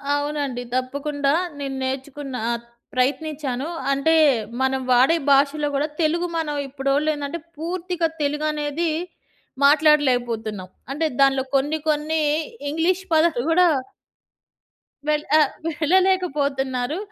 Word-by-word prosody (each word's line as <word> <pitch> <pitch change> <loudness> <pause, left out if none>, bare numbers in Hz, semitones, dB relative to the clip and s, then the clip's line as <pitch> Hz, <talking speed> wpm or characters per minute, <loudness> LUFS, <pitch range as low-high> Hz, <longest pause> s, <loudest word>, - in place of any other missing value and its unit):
అవునండి. 290 -4 -2
తప్పకుండా 280 +2 -1 0.3
నేను 275 -1 -4
నేర్చుకున్న. 265 +1 -4 0.2
ఆ! - - +1 0.4
ప్రయత్నించాను. 275 +1 -1 0.2
అంటే 275 +4 +2 0.5
మనం 265 0 +1
వాడే 255 +6 +5
భాషలో 285 +2 +3
గూడా 285 +2 +1
తెలుగు 335 +2 +1
మనం 305 -2 -2
ఇప్పుడోళ్ళు 275 +2 0
ఏందంటే 290 +3 -4 0.2
పూర్తిగా 345 +1 -2
తెలుగనేది 300 +2 -1 0.8
మాట్లాడలేకపోతున్నాం. 245 - +2 0.2
అంటే 315 +3 -1 0.2
దానిలో 270 -1 +4
కొన్ని, 290 +3 +1
కొన్ని 310 +1 0 0.5
ఇంగ్లీష్ 345 +5 0
పదాలు 315 -6 +3
కూడా 360 +2 +5 1.4
వెళ్ 300 0 +1
ఆహ్, 300 -3 +4 0.3
వెళ్ళలేకపోతున్నారు. 300 -6 +1
290 Hz, 100 wpm, -22 LUFS, 270-315 Hz, 1.4 s, వాడే